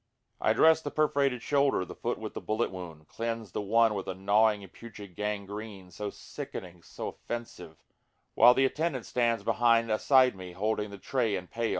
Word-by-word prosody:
I - - +2
dress 160 0 +5
the 145 - -4
perforated 140 -5 +1
shoulder, 140 -9 +2
the - - -9
foot - - -3
with - - -7
the - - -6
bullet 110 +2 -1
wound, 80 -5 -9
Cleanse 115 -3 -4
the 105 - -3
one 110 +2 +3
with 100 -2 -4
a 95 - -3
gnawing 105 +2 +2
and 95 - -14
putrid 105 -5 -11
gangrene, 105 -1 -5
so 105 +4 -5
sickening, 90 -3 -8
so - - -6
offensive, 120 0 -8 0.5
While 125 +1 +7
the 135 - +4
attendant 145 -2 -1
stands 120 -2 0
behind 115 0 +3
aside 130 +2 +4
me 90 -1 -9
holding 105 +2 -1
the 100 - -9
tray 115 0 -1
and 90 -1 -6
pail. 115 -1 -1
110 Hz, 185 wpm, -29 LUFS, 100-120 Hz, 0.5 s, While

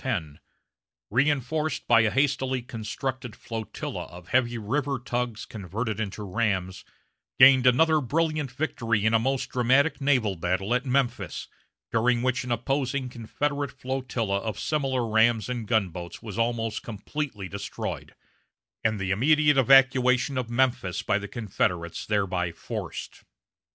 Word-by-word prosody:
10, 85 - -3 0.7
reinforced 145 +4 0
by 115 -1 +6
a 110 - +3
hastily 130 -1 0
constructed 120 +1 -5
flotilla 115 -2 -5
of 90 0 -13
heavy 120 -2 +2
river 135 +6 -1
tugs 120 -2 -3
converted 110 +2 -4
into 105 -1 -4
rams, 95 -2 -1 0.5
gained 130 0 +8
another 155 +5 +4
brilliant 155 +2 0
victory 115 -6 -1
in 110 - +3
a 115 - +5
most 130 +3 -1
dramatic 130 +4 +2
naval 125 -8 +2
battle 95 +5 -1
at 125 +2 0
Memphis, 125 -2 -1 0.4
during 120 +1 +2
which 130 0 0
an 125 - -5
opposing 130 +2 -1
Confederate 140 +5 -3
flotilla 125 -6 -2
of 105 -1 -4
similar 135 -5 -1
rams 110 0 +3
and 120 -3 -4
gunboats 90 -6 -1
was 110 -3 -8
almost 115 -1 -1
completely 110 -1 -5
destroyed, 100 +1 -6 0.7
and 110 -2 +1
the 95 -1 -2
immediate 145 +6 +4
evacuation 135 0 +5
of 125 -2 -2
Memphis 120 -6 0
by 100 - +1
the 100 - -6
Confederates 90 -7 -2
thereby 95 -4 0
forced. 80 - -7
120 Hz, 130 wpm, -26 LUFS, 105-135 Hz, 0.7 s, gained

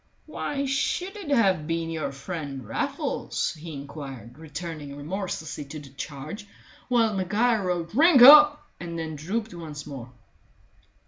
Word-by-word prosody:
"Why 280 -1 -3
should 355 +8 -1
it 395 -8 -7
have 190 - +2
been 165 0 -2
your 160 -2 -3
friend 140 - -6
Raffles?" 115 - -2
he 160 +1 -9
inquired, 140 -3 -9
returning 155 -2 -7
remorselessly 160 -1 -5
to 150 +2 -8
the 145 -2 -12
charge, 150 - -7 0.4
while 230 -3 +3
Maguire 210 +4 +1
roared 175 -2 -2
"Drink 290 +1 +6
up!" 300 +2 +9
and 170 -1 -6
then 160 -1 -4
drooped 200 +8 -3
once 155 -4 -8
more. 130 -4 -8
165 Hz, 135 wpm, -26 LUFS, 145-225 Hz, 0.4 s, up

